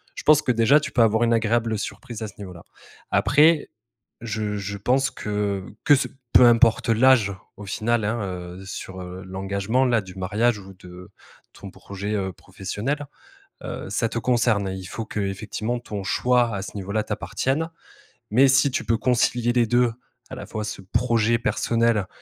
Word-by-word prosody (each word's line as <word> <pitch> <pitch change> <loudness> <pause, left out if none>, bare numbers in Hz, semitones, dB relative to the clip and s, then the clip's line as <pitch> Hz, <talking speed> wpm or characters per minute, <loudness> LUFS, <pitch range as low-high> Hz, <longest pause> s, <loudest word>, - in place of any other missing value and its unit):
je - - -7
pense 155 0 +6
que - - +1
déjà, 125 +6 +4
tu 140 - -5
peux 120 - +4
avoir 110 +1 +3
une 115 - +2
agréable 115 -1 +1
surprise 115 +2 -7
à 110 - -3
ce - - -12
niveau-là. 90 -4 -10 0.5
Après, 150 +2 +4 0.5
je 105 -2 -3
je 100 0 -5
pense 135 +6 +1
que 105 -3 -2 0.2
que - - +7
ce 135 - -1 0.3
peu 125 - +8
importe 115 -1 +4
l'âge 115 -2 +4 0.2
au 105 - -10
final, 110 +3 0
hein, 115 +3 -1
heu, 90 0 -7
sur, 95 -1 -7
heu, 90 +1 -8
l'engagement, 100 +6 -1
là, 120 -3 +2
du 95 -2 -11
mariage, 105 +4 0
ou 95 0 -12
de 90 0 -13 0.4
ton - - -10
projet, 100 +1 -6
heu, 95 -2 -1
professionnel, 125 - -4 0.6
heu, - - -6
ça 115 - 0
te 115 - -3
concerne, 115 -4 +1
il 95 - -8
faut 115 - -5
qu'effectivement 105 +4 -3
ton 105 -4 -6
choix 120 +3 +2
à 95 - -3
ce 105 - -8
niveau-là 100 +2 -2
t'appartienne, 155 +5 -2 0.6
mais 130 +5 +6
si 135 +1 +4
tu - - -2
peux 115 +1 +1
concilier 120 -1 +1
les 120 -2 +3
2, 120 0 +2 0.4
à - - -5
la - - -7
fois, 110 - -4
ce 105 -2 -6
projet 115 +3 +1
personnel 115 -3 +1
110 Hz, 175 wpm, -23 LUFS, 100-120 Hz, 0.6 s, peu